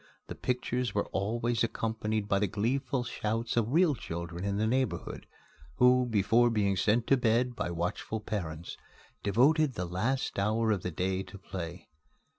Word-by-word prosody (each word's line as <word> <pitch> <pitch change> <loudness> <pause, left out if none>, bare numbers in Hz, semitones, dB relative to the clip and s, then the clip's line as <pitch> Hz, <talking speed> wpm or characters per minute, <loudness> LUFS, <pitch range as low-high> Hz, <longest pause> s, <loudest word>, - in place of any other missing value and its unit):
The - - -3
pictures 125 -2 -2
were 100 - +1
always 115 +4 0
accompanied 110 -2 -1
by 100 -1 +2
the 105 - +2
gleeful 125 +6 -1
shouts 115 -1 -2
of 115 0 +1
real 165 +1 +4
children 85 -5 -5
in 100 0 -1
the 110 - +1
neighborhood, 130 +3 -1 0.5
who, 125 0 +5
before 115 +3 +4
being 100 -4 +1
sent 110 +5 +2
to 135 - +4
bed 120 +1 +2
by 90 - -2
watchful 85 +6 -3
parents, 85 -6 -5 0.4
devoted 135 - +3
the 90 - -2
last 105 +8 -1
hour 110 +2 +1
of 100 -4 0
the 90 - -3
day 95 +3 -1
to 95 +1 -10
play. 90 -3 -7
110 Hz, 160 wpm, -30 LUFS, 95-120 Hz, 0.5 s, who